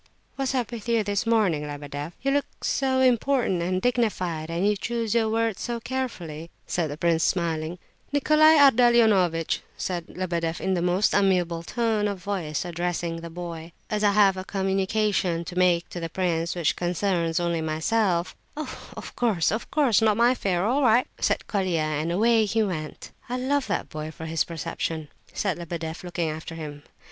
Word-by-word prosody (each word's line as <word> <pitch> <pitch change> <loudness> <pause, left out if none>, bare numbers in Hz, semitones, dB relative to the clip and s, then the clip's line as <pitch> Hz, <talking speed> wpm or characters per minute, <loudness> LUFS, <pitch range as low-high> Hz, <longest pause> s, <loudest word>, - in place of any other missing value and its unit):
"What's 270 -1 -1
up 245 -3 -1
with 235 -1 -6
you 230 -2 +3
this 205 +2 -1
morning, 210 -10 +2
Lebedeff? 145 +2 -6
You 275 - +2
look 285 0 -2
so 260 -1 +1
important 250 -6 +2
and 185 +2 0
dignified, 185 -9 0
and 170 +4 0
you 210 - +3
choose 230 +1 -2
your 225 -2 +2
words 225 -2 0
so 240 -1 -3
carefully," 185 -11 -5 0.2
said 170 -3 -1
the 145 - -6
prince, 165 0 +2
smiling. 165 -1 -1 0.3
"Nicolai 305 +2 +5
Ardalionovitch!" 220 - +4 0.2
said 175 -2 -3
Lebedeff, 170 -3 -2
in 190 0 0
a 175 - 0
most 180 +4 +2
amiable 180 -4 +2
tone 220 +2 0
of 200 -1 -3
voice, 180 -5 -3
addressing 175 -1 -2
the 170 0 -7
boy. 165 -1 -7 0.2
"As 210 0 0
I 205 -1 +4
have 195 -2 +4
a 185 - -4
communication 195 -2 0
to 175 - -7
make 180 -2 +3
to 175 - -6
the 165 -1 -4
prince 170 -1 -1
which 170 -3 +1
concerns 175 -2 0
only 170 -1 0
myself—" 170 +3 0 0.2
"Of 310 - -7
course, 210 -10 +1
of 220 +3 -3
course, 260 -9 +3
not 215 -2 +3
my 235 +1 +5
affair. 190 -7 0
All 260 +6 +2
right," 245 -1 +4
said - - 0
Colia, 185 -5 0
and 155 +1 -1
away 220 +4 +3
he 220 +2 +1
went. 160 -7 -5 0.2
"I 250 - -1
love 270 +2 0
that - - -2
boy 155 0 -5
for 160 +1 -8
his 160 0 0
perception," 165 -1 -4 0.2
said 190 -4 -2
Lebedeff, 165 -1 -5
looking 175 -2 -2
after 160 +1 -5
him. 150 -2 -7
185 Hz, 175 wpm, -25 LUFS, 165-225 Hz, 0.3 s, Nicolai